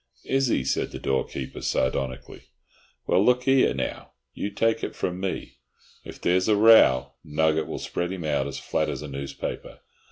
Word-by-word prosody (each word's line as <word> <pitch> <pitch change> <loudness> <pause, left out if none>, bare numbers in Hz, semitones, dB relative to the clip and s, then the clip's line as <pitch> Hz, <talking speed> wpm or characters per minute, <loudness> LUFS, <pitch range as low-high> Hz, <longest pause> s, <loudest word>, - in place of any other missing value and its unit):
"Is 135 0 +1
he?" 90 - +1
said 65 - -1
the - - -7
doorkeeper, 65 0 -3
sardonically. 65 0 -2 0.6
"Well, 95 - +3
look 125 +2 +2
'ere, 135 -1 +4
now, - - -5 0.2
you 100 - -3
take 115 +2 0
it - - -4
from 90 0 -3
me, 95 -1 -5 0.4
if - - -10
there's 90 +1 +1
a 110 - +4
row 105 - +6
Nugget 80 +1 +1
will - - -5
spread 90 +1 -3
him 95 -3 -5
out 70 -2 0
as 70 - -6
flat 80 -1 -1
as 70 -1 -4
a - - -6
newspaper. 70 0 -6
80 Hz, 170 wpm, -25 LUFS, 70-105 Hz, 0.6 s, row